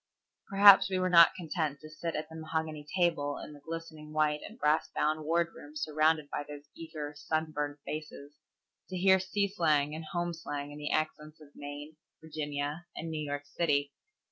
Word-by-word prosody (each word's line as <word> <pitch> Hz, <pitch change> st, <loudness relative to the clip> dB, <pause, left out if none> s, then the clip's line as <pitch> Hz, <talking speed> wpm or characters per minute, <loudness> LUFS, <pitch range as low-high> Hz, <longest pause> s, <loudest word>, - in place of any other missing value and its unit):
Perhaps 200 Hz, 0 st, +8 dB
we 190 Hz, -, 0 dB
were 185 Hz, 0 st, +1 dB
not 170 Hz, -1 st, +8 dB
content 155 Hz, -4 st, -2 dB
to 155 Hz, -, -10 dB
sit 155 Hz, +2 st, -5 dB
at 155 Hz, 0 st, -3 dB
the 160 Hz, -, -12 dB
mahogany 155 Hz, -1 st, -4 dB
table 145 Hz, -5 st, +1 dB
in -, -, -8 dB
the 145 Hz, -, -12 dB
glistening 160 Hz, 0 st, -8 dB
white 150 Hz, -1 st, +2 dB
and 220 Hz, -, -10 dB
brass 150 Hz, -7 st, +2 dB
bound 155 Hz, 0 st, +1 dB
wardroom 165 Hz, -2 st, -1 dB
surrounded 155 Hz, 0 st, +2 dB
by -, -, -2 dB
those 145 Hz, 0 st, -9 dB
eager, 155 Hz, -3 st, -6 dB
sunburned 150 Hz, -1 st, -2 dB
faces, 150 Hz, -2 st, -7 dB, 0.6 s
to 185 Hz, -, -4 dB
hear 190 Hz, +1 st, +5 dB
sea 200 Hz, +2 st, 0 dB
slang 155 Hz, -7 st, +1 dB
and 160 Hz, +1 st, -6 dB
home 175 Hz, +2 st, -2 dB
slang 145 Hz, -3 st, -5 dB
in 145 Hz, -, -9 dB
the 150 Hz, -, -3 dB
accents 155 Hz, 0 st, -2 dB
of 150 Hz, -2 st, -15 dB
Maine, 145 Hz, +2 st, -8 dB, 0.2 s
Virginia, 150 Hz, +1 st, -4 dB
and 165 Hz, 0 st, -5 dB
New 155 Hz, -1 st, -3 dB
York 145 Hz, 0 st, -4 dB
City. 145 Hz, -2 st, 0 dB
155 Hz, 175 wpm, -31 LUFS, 150-165 Hz, 0.6 s, Perhaps